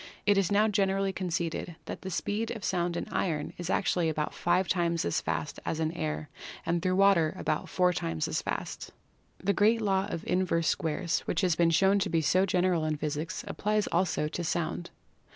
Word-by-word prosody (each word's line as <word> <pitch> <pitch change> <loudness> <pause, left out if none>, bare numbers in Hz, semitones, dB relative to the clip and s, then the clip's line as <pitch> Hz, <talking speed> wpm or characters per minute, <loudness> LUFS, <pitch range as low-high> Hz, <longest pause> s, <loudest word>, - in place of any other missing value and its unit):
It 205 0 +5
is 195 -2 +2
now 210 +2 +4
generally 195 -1 +1
conceded 175 -2 -3
that - - -6
the 190 - -5
speed 210 +5 -2
of 220 -3 -5
sound 175 -3 0
in - - -3
iron 155 -5 -1
is 175 0 -4
actually 180 -4 +1
about 155 -1 -2
five 175 +2 +1
times 170 -2 +1
as 85 - 0
fast - - -3
as 160 - -2
in 160 0 0
air 75 - -3 0.4
and 170 0 0
through 185 0 +1
water 190 -5 +4
about 155 - -2
four 180 -1 +2
times 80 - -2
as - - -1
fast. - - -4 0.5
The 200 +2 0
great 220 +3 +4
law 195 -2 +1
of 170 - -5
Inverse 175 -3 +1
Squares 165 +2 0
which 165 - 0
has 180 -3 +2
been 170 +1 +3
shown 190 +5 +4
to 190 - 0
be 165 -1 +2
so 185 +6 +3
general 180 -3 +2
in 155 -1 -1
physics 155 +3 -3
applies 210 +1 0
also 175 -3 +1
to 175 +3 -4
Sound. 170 +1 -2
175 Hz, 195 wpm, -29 LUFS, 165-195 Hz, 0.5 s, It